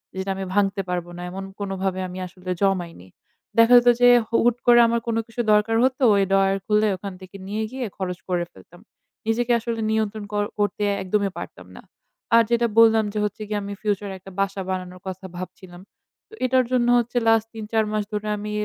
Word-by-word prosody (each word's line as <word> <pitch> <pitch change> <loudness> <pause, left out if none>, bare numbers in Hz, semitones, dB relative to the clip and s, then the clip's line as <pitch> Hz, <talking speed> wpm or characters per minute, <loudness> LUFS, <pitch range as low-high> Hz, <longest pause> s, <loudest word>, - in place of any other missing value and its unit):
যেটা 190 +1 -4
আমি 190 0 -4
ভাঙতে 200 0 +1
পারব 175 -1 -2
না - - -7
এমন 195 +1 -6 0.2
কোনভাবে 195 -1 -2
আমি 180 0 -8
আসলে 180 0 -11
জমাইনি। 175 - -1 0.5
দেখা 230 +1 +6
যেত 240 0 +4
যে 245 - +8 0.2
হু 230 - -3
হুট 240 0 +3
করে 240 0 +7
আমার 235 0 +1
কোন 230 - 0
কিছু 230 +1 -3
দরকার 210 +2 +2
হতো 260 +1 +1
ওই 200 - +3
ডয়ার 195 0 +3
খুলে 215 0 +2
ওখান 195 +1 -7
থেকে 185 +1 -13
নিয়ে 215 +2 -2
গিয়ে 260 -1 -4
খরচ 180 -2 -3
করে 175 -1 0
ফেলতাম। 175 - -17 0.5
নিজেকে 240 +2 +1
আসলে 230 0 -4
নিয়ন্ত্রণ 220 -1 -1
ক - - -4 0.2
করতে 205 0 0 0.2
একদমই 200 +1 0
পারতাম - - -9
না। - - -11 0.5
আর 230 - +7
যেটা 235 0 +2
বললাম 225 -1 +6
যে - - -4
হচ্ছে 210 +2 -3
গিয়ে 210 0 -2
আমি 200 0 -5
future 205 -1 -2
একটা 195 +1 -13
বাসা 195 0 -1
বানানোর 185 -1 -5
কথা 190 0 -6
ভাবছিলাম। 180 0 -9 0.5
তো - - -21
এটার 255 0 +3
জন্য 245 -2 +2
হচ্ছে 240 +1 -1
last 225 -1 +4
৩-৪ 220 0 -1
মাস 215 -1 0
ধরে 210 0 -3
আমি 210 +1 -5
205 Hz, 195 wpm, -23 LUFS, 190-225 Hz, 0.5 s, যে